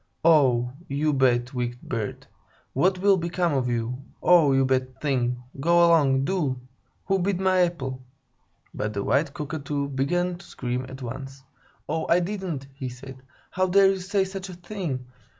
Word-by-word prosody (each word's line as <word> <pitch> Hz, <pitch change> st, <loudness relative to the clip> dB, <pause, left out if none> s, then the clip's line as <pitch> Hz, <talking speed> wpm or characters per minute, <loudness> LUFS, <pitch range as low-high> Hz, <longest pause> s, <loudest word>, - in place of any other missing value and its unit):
"Oh, 130 Hz, -7 st, +4 dB, 0.2 s
you 150 Hz, +2 st, 0 dB
bad, 125 Hz, -2 st, +2 dB
wicked 120 Hz, -1 st, -3 dB
bird! 115 Hz, -4 st, -4 dB, 0.5 s
What 185 Hz, +7 st, +2 dB
will 195 Hz, +1 st, +4 dB
become 170 Hz, -1 st, 0 dB
of 130 Hz, -3 st, 0 dB
you? 120 Hz, +2 st, -2 dB, 0.2 s
Oh, 170 Hz, -5 st, +6 dB
you 135 Hz, 0 st, +3 dB
bad 130 Hz, -1 st, -1 dB
thing! 125 Hz, -4 st, -1 dB, 0.2 s
Go 170 Hz, +4 st, +5 dB
along, 140 Hz, -5 st, +4 dB
do! 145 Hz, -8 st, -1 dB, 0.5 s
Who 195 Hz, 0 st, +1 dB
bit 185 Hz, 0 st, 0 dB
my 190 Hz, -1 st, +3 dB
apple?" 135 Hz, -8 st, -1 dB, 0.7 s
But 105 Hz, 0 st, -3 dB
the 100 Hz, -1 st, -2 dB
white 140 Hz, +5 st, +1 dB
Cockatoo 145 Hz, -1 st, -3 dB
began 175 Hz, +7 st, 0 dB
to -, -, -13 dB
scream 125 Hz, +1 st, -4 dB
at 135 Hz, 0 st, -9 dB
once. 135 Hz, +2 st, -7 dB, 0.4 s
"'Oh, 160 Hz, -, -2 dB
I 170 Hz, -, +5 dB
didn't!" 180 Hz, -6 st, -3 dB
he 135 Hz, -2 st, -5 dB
said. 130 Hz, +1 st, -11 dB, 0.3 s
"How 185 Hz, +1 st, +1 dB
dare 195 Hz, +1 st, +5 dB
you 195 Hz, -, -2 dB
say 195 Hz, +2 st, 0 dB
such 190 Hz, 0 st, -6 dB
a -, -, -7 dB
thing? 175 Hz, -8 st, -5 dB
140 Hz, 165 wpm, -25 LUFS, 130-180 Hz, 0.7 s, Oh